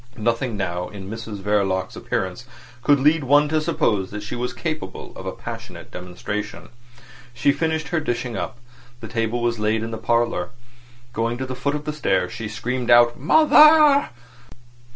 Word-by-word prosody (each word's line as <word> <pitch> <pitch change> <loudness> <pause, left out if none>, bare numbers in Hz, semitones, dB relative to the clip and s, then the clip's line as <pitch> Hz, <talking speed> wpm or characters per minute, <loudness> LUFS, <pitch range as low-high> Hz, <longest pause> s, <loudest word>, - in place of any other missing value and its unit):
Nothing 115 +1 -1
now 90 -2 -3
in 100 -1 -9
Mrs 110 -3 -7
Verloc's 100 -2 0
appearance - - -3 0.3
could 145 +2 +4
lead 150 +3 +3
one 145 +3 +4
to 155 0 +1
suppose 105 - 0
that 105 0 -6
she 105 - -5
was 125 +1 -2
capable 155 -2 -5
of - - -8
a - - -1
passionate - - -9
demonstration. 90 +4 -6 0.7
She 140 - +3
finished 160 +1 -1
her 170 - +1
dishing 120 -5 -3
up. - - -4 0.4
The 110 - -8
table 115 +1 -2
was 120 -2 0
laid 110 +1 0
in 115 - -5
the 110 - -5
parlour. 115 -5 0 0.6
Going 115 0 -1
to 130 - -3
the 130 - -5
foot 140 +3 -2
of 150 0 -5
the 150 - -2
stairs, 145 -11 0
she 115 - -5
screamed 125 +3 -3
out 120 0 +6
"Mother!" 305 - +6
120 Hz, 170 wpm, -22 LUFS, 105-145 Hz, 0.7 s, out